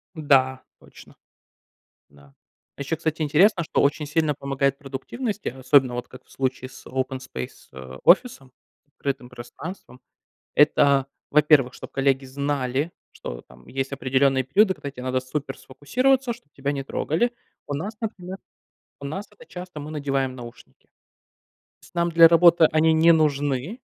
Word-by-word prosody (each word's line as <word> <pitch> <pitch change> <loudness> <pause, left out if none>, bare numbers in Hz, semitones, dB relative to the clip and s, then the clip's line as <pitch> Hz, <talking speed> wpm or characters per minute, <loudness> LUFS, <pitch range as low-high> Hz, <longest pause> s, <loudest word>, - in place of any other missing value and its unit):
Да, 130 -4 +2 0.2
точно. - - -17 0.9
Да. 70 -1 -21 0.4
Ещё, 140 +3 -3
кстати, 160 0 -2
интересно, 170 +5 +4
что - - 0
очень 150 +1 +1
сильно 155 0 0
помогает 140 0 -1
продуктивности, 200 - -5
особенно 130 0 +3
вот 125 - -5
как 130 0 -14
в - - -29
случае 130 -1 -3
с - - -15
open 130 0 -3
space, 65 - -8
э, 65 0 -10
офисом, 170 - +3 0.3
открытым 140 -3 -5
пространством, 125 +3 -10 0.5
это, 140 -2 +4 0.2
во-первых, 150 -3 +4
чтоб - - -10
коллеги 135 0 +1
знали, 140 +2 -2 0.2
что - - -8
там 65 0 -19
есть 135 +1 -3
определённые 135 0 +1
периоды, 190 - +3
когда 140 -5 -7
те 125 -2 -10
надо 130 0 -1
супер 135 +1 -5
сфокусироваться, 250 - 0
чтоб 150 -9 -19
тебя 140 +1 -2
не 140 -1 -4
трогали. 165 - -1 0.4
У 145 - -3
нас, 195 +10 -4
например 190 -4 -5 0.6
у 140 - -11
нас 190 +9 -5
это 485 - -17
часто 180 - -9
мы 150 +1 -7
надеваем 135 -3 -2
наушники. 120 -1 -13 0.9
Тс - - -20
нам 170 0 +1
для 165 0 +8
работы 170 0 +6
они 160 +1 +3
не 160 +1 +5
нужны, 145 - 0
140 Hz, 150 wpm, -24 LUFS, 130-160 Hz, 0.9 s, для